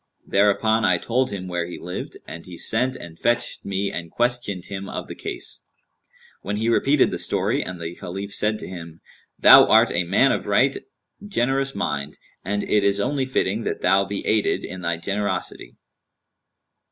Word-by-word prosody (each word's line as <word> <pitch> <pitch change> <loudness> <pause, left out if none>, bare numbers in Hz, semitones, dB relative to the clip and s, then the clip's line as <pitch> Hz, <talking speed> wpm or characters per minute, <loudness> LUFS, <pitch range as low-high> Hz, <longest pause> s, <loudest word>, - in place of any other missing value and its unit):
Thereupon 105 +2 +2
I 90 -4 +4
told 125 +8 0
him 95 -2 -6
where 90 -1 -2
he 90 - -7
lived 90 +1 -7
and 80 +2 -9
he 90 -2 -9
sent 125 +8 +1
and 85 -9 -11
fetched 120 0 0
him 100 0 -2
and 85 -1 -5
questioned 120 -6 -1
him 100 0 -6
of - - -5
the - - -7
case; - - -5 0.8
when 100 +2 -3
he 110 +2 0
repeated 140 +4 +3
the - - -3
story - - 0
and 90 0 -6
the 85 0 -5
Caliph 95 +3 -7
said 105 0 +1
to - - -8
him, 85 -3 -9 0.4
'Thou - - +9
art - - +5
a 90 - +1
man 85 - +3
of - - -2
right - - +3 0.5
generous 135 -7 0
mind, 75 +1 -3 0.3
and 105 +2 -2
it 105 -1 +2
is 100 0 +2
only 130 +4 0
fitting 110 -4 0
that - - -3
thou 95 +2 +4
be 100 +1 -5
aided 110 -1 +1
in 95 0 -7
thy 85 -1 -1
generosity.' 95 -8 -3
100 Hz, 175 wpm, -23 LUFS, 90-115 Hz, 0.8 s, Thou